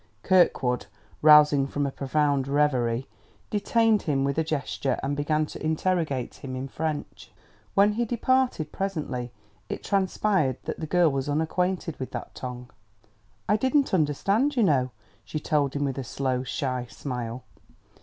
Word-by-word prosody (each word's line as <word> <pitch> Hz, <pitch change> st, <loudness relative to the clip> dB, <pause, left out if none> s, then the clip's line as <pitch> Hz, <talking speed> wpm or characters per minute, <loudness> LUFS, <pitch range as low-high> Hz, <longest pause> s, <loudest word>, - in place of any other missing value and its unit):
Kirkwood, 135 Hz, -9 st, +3 dB, 0.3 s
rousing 150 Hz, -2 st, +7 dB
from 145 Hz, +1 st, -2 dB
a 140 Hz, -, -2 dB
profound 140 Hz, 0 st, 0 dB
reverie, 130 Hz, -4 st, +1 dB, 0.4 s
detained 220 Hz, +1 st, +2 dB
him 140 Hz, -3 st, 0 dB
with 140 Hz, +3 st, 0 dB
a -, -, +2 dB
gesture 140 Hz, -3 st, -2 dB
and 140 Hz, +1 st, -1 dB
began 150 Hz, +2 st, +1 dB
to -, -, -9 dB
interrogate 155 Hz, -4 st, 0 dB
him 130 Hz, -1 st, -6 dB
in 130 Hz, +1 st, -4 dB
French. 140 Hz, -10 st, -5 dB, 0.4 s
When 205 Hz, +1 st, +5 dB
he 235 Hz, +2 st, 0 dB
departed 245 Hz, -, +1 dB
presently 150 Hz, -11 st, -3 dB, 0.4 s
it -, -, -5 dB
transpired 190 Hz, -, +1 dB
that -, -, -5 dB
the 160 Hz, -, -4 dB
girl 175 Hz, -1 st, +3 dB
was 135 Hz, +1 st, -2 dB
unaquainted 165 Hz, +2 st, -1 dB
with 130 Hz, -, -4 dB
that -, -, -6 dB
tongue. 125 Hz, -1 st, -7 dB, 0.8 s
"I 210 Hz, -, +3 dB
didn't 265 Hz, +3 st, +1 dB
understand, 195 Hz, -, +2 dB
you 240 Hz, -, +3 dB
know," 135 Hz, -8 st, +3 dB, 0.3 s
she 155 Hz, -, -4 dB
told 145 Hz, -2 st, 0 dB
him 145 Hz, 0 st, 0 dB
with 135 Hz, -1 st, -2 dB
a -, -, -3 dB
slow, 130 Hz, 0 st, -1 dB
shy 130 Hz, -1 st, -3 dB
smile. 125 Hz, -2 st, -5 dB
150 Hz, 150 wpm, -26 LUFS, 135-185 Hz, 0.8 s, rousing